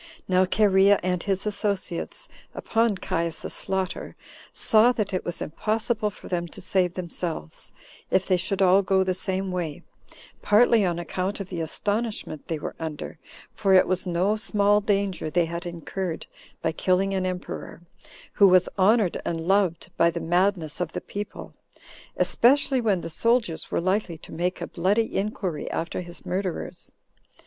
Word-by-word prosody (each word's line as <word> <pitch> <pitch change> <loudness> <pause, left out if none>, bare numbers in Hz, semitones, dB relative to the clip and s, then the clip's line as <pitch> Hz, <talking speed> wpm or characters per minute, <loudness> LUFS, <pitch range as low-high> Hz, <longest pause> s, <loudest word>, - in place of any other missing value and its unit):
Now 185 0 +4
Cherea 200 0 +4
and 180 -1 0
his 195 -1 -1
associates, 200 -4 -2 0.3
upon 225 -2 +1
Caius's 165 -2 -2
slaughter, 190 -1 -3 0.4
saw 225 +3 +4
that 210 -5 -2
it 185 - -1
was 175 - -3
impossible 215 +5 -1
for 205 - -12
them 175 -1 -2
to 170 - -11
save 180 -1 +1
themselves, 170 - -5 0.4
if 190 0 +2
they 185 - +3
should 195 +2 0
all 190 +1 +6
go 190 0 +2
the 185 0 0
same 190 +1 -2
way, 170 -5 -4 0.6
partly 220 +1 +5
on 175 -3 0
account 185 +3 -3
of 195 -2 -6
the 175 -3 -3
astonishment 205 -1 -2
they 165 - -2
were 150 - -5
under; 160 0 -6 0.3
for 195 -2 +3
it 185 - +7
was 185 0 0
no 180 +4 +1
small 205 -1 +2
danger 200 -5 0
they 170 +1 +2
had 170 +2 -5
incurred 170 +1 -4 0.4
by - - +1
killing 185 +4 +1
an 185 -1 0
emperor, 180 -1 -6 0.5
who 200 - +6
was 185 -1 +5
honored 205 -1 +3
and 165 - -2
loved 190 -4 +1
by 170 - +5
the - - -3
madness 175 -2 0
of 170 -2 -2
the - - -3
people, 205 +1 -7 0.6
especially 265 +1 +3
when 205 -6 +1
the 165 - -5
soldiers 230 -3 +1
were - - 0
likely 185 -1 0
to - - -13
make 180 +3 -2
a - - -1
bloody 200 +6 0
inquiry 195 -5 -2
after 165 +2 -3
his 175 0 -9
murderers. 185 -1 -4
185 Hz, 160 wpm, -25 LUFS, 175-205 Hz, 0.6 s, it